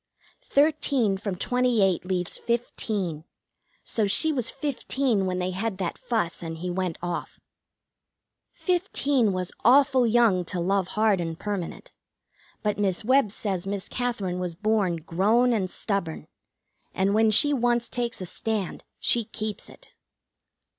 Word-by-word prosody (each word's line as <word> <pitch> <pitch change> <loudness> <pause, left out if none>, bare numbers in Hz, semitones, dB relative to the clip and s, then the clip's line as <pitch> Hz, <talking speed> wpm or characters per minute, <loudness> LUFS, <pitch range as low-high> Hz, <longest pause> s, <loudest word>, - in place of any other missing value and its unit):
Thirteen 280 -7 +2
from 195 -1 -4
twenty 245 +2 +1
eight 185 -2 +1
leaves 180 -1 -2
fifteen, 210 -8 -2 0.6
so 215 -3 0
she 315 +11 +3
was 250 -6 -1
fifteen 260 -7 -1
when 180 0 -1
they 180 0 -1
had 195 +2 -3
that 180 -3 -2
fuss 220 -8 -2
and 165 -1 -5
he 180 +2 -4
went 180 -2 -2
off. 175 -1 -4 1.1
Fifteen 290 - +1
was 185 -1 -3
awful 260 0 +5
young 225 -5 +4
to 180 - -3
love 190 +1 +1
hard 215 -4 +3
and 165 -1 -4
permanent; 200 -4 -5 0.7
but 210 -1 0
Miss 195 0 0
Webb 255 -4 +4
says 195 -3 -3
Miss 200 -1 -3
Katherine 210 -8 -2
was 180 -2 -3
born 210 -2 +1
grown 205 +10 +2
and 195 -5 0
stubborn, 195 -5 -3 0.7
and 195 +1 +2
when 220 +1 +4
she 290 +8 +5
once 240 -2 +1
takes 240 -3 -3
a - - -3
stand 210 +1 -3 0.2
she 235 - +3
keeps 215 -1 -5
it. - - -17
210 Hz, 140 wpm, -26 LUFS, 185-240 Hz, 1.1 s, awful